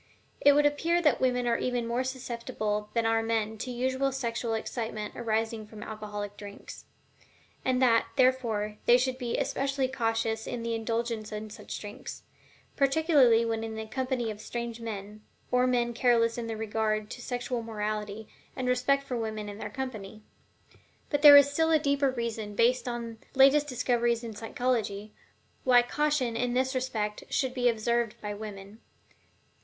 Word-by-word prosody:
It 285 - +7
would 295 +1 +4
appear 325 +4 +2
that 300 -8 +2
women 250 -1 +1
are 235 -1 +1
even 245 -2 -1
more 235 +2 0
susceptible 235 -5 -3
than 230 -1 +2
are 225 0 +3
men 220 -1 -1
to 255 - -4
unusual 260 +2 0
sexual 235 -3 -2
excitement 220 -2 -4
arising 225 -1 -2
from 215 -1 -10
alcoholic 210 -1 -6
drinks; 205 -1 -10 0.8
and 255 -1 +1
that, 230 -2 +4
therefore, 230 -6 +1
they 240 - +8
should 255 0 -1
be 240 -2 -2
especially 275 -1 0
cautious 225 -3 -1
in 235 -1 -4
the 230 0 -2
indulgence 225 -1 -2
in 215 0 -6
such - - -7
drinks, 205 0 -8 0.5
particularly 275 -5 +4
when 225 -1 -1
in 220 -1 -5
the 220 0 -5
company 250 0 -2
of 210 0 -9
strange 235 -1 -5
men, 210 -1 -6 0.3
or 250 0 +3
men 240 -1 +1
careless 230 -1 +3
in 235 -1 -4
regard 215 -1 -2
to 245 - -7
sexual 245 0 -3
morality 215 -1 -4 0.3
and 260 -2 -3
respect 255 +3 +2
for 255 -3 -4
women 215 -2 -4
in 205 0 -8
their - - -5
company. 220 -6 -6 0.9
But 290 -2 +1
there 290 -1 +11
is 285 0 +6
still 320 +2 +2
a 320 - +5
deeper 280 -2 +1
reason, 230 -4 -4
based 245 +4 +2
upon 235 -2 -5
the - - -13
latest 280 +2 +6
discoveries 240 -2 0
in 225 -2 -6
psychology, 220 -3 -2 0.5
why 245 -1 +6
caution 295 -3 0
in 245 +1 -1
this 260 +1 +1
respect 220 -5 -2
should 260 -2 0
be 245 -1 +2
observed 235 0 0
by 210 -1 -4
women. 205 0 -9
235 Hz, 165 wpm, -29 LUFS, 220-255 Hz, 0.9 s, there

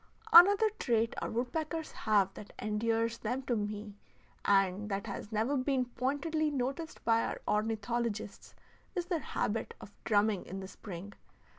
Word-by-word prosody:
Another 405 +5 +8
trait 230 -2 +1
our - - -2
woodpeckers 310 +7 -2
have 200 -3 +2
that 210 - -10
endears 225 +2 0
them 250 +5 -2
to 250 -2 0
me, 210 0 -4 0.5
and 195 +1 +2
that 200 +1 -2
has 205 0 -6
never 220 +6 +1
been 260 -1 +1
pointedly 285 +6 -1
noticed 275 +4 -3
by 230 0 +4
our - - -3
ornithologists, 220 0 -2 0.4
is 355 -2 -1
their 350 -2 -1
habit 225 -5 -2
of 205 - -12
drumming 210 -2 +2
in 190 +2 -5
the 190 - -6
spring. 195 0 -8
225 Hz, 145 wpm, -32 LUFS, 205-270 Hz, 0.5 s, Another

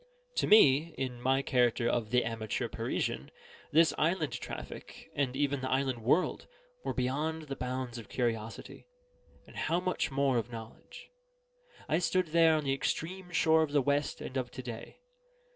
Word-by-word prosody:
To - - +2
me, 155 -5 +6
in 125 -2 -3
my 135 +2 +2
character 120 -2 +2
of 120 -2 0
the 125 +1 +2
Amateur 110 -2 -2
Parisian, - - -2 0.4
this 160 +1 +5
island 155 -4 +1
traffic, 125 - -8
and 135 -3 -1
even 140 -1 0
the 130 - -2
island 130 -2 0
world, 155 +10 +1 0.4
were - - -1
beyond 150 +5 -1
the 140 -2 -5
bounds 125 -1 -4
of 110 - -11
curiosity, 115 - -3 0.6
and - - -16
how 170 +2 0
much 185 0 -1
more 135 -3 +2
of 120 +2 -6
knowledge. 115 -1 -10 0.8
I 160 - +2
stood 180 -1 +1
there 165 0 +5
on 155 - 0
the 135 -1 +1
extreme 180 +6 -3
shore 160 -2 +4
of 150 -2 -1
the 145 - +5
West 145 +2 0
and 130 - -5
of 125 -1 -2
to 130 - -8
day. 120 - -8
135 Hz, 165 wpm, -31 LUFS, 125-160 Hz, 0.8 s, me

